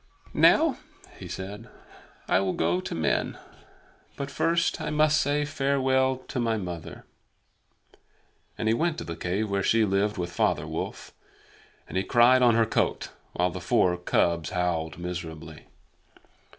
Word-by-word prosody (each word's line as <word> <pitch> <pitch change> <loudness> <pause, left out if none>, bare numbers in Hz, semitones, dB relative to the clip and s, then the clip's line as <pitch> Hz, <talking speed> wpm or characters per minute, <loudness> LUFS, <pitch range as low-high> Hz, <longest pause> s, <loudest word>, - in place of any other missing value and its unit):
"Now," - - +4 0.4
he - - -8
said, 105 +5 -7 0.6
"I - - +3
will 95 -1 0
go 85 +2 +1
to - - -5
men. 80 - 0 0.8
But 140 0 -5
first 170 +1 +1
I - - -3
must 155 0 +3
say 145 +1 0
farewell 135 -2 +1
to - - -3
my 115 -2 +1
mother." 90 -5 -7 1.5
And 110 - -2
he 110 - +4
went 160 +6 0
to - - -4
the 85 - -6
cave 95 +5 -2
where 100 0 +1
she 110 +3 +3
lived 100 +1 0
with 85 -1 -3
Father 85 - 0
Wolf, - - -6 0.7
and - - -4
he 95 - +1
cried 120 +4 +5
on 120 -2 +5
her 115 0 +4
coat, 110 - -1 0.2
while 90 0 +1
the - - -7
four 90 -1 +2
cubs 85 -2 0
howled 85 -3 -2
miserably. 80 -3 -7
100 Hz, 150 wpm, -26 LUFS, 90-130 Hz, 1.5 s, cried